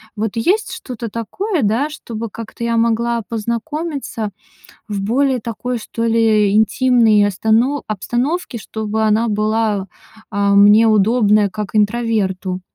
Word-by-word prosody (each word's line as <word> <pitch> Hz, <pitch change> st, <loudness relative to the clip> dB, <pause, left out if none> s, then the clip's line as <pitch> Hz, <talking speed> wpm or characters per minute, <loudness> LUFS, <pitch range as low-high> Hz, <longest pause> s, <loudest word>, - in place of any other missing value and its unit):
Вот 215 Hz, 0 st, -2 dB
есть 380 Hz, -, +1 dB
что-то 245 Hz, -10 st, -6 dB
такое, 315 Hz, -, -3 dB
да, 230 Hz, +8 st, +1 dB
чтобы 230 Hz, -7 st, -6 dB
как-то 230 Hz, +2 st, -8 dB
я 235 Hz, 0 st, 0 dB
могла 235 Hz, +1 st, +1 dB
познакомиться 235 Hz, -, -4 dB, 0.6 s
в 205 Hz, -2 st, -3 dB
более 255 Hz, +5 st, +1 dB
такой, 235 Hz, +2 st, -4 dB
что 230 Hz, +1 st, -5 dB
ли, 220 Hz, -3 st, +3 dB
интимной 220 Hz, -1 st, +4 dB
остано 220 Hz, +8 st, +1 dB
обстановке, 240 Hz, -, -2 dB
чтобы 220 Hz, 0 st, -4 dB
она 220 Hz, +2 st, +2 dB
была, 215 Hz, -2 st, 0 dB, 0.4 s
а, 200 Hz, -1 st, +1 dB
мне 205 Hz, +3 st, +6 dB
удобная 215 Hz, -1 st, +3 dB
как 210 Hz, +1 st, -6 dB
интроверту. 205 Hz, -4 st, 0 dB
225 Hz, 120 wpm, -18 LUFS, 210-240 Hz, 0.6 s, мне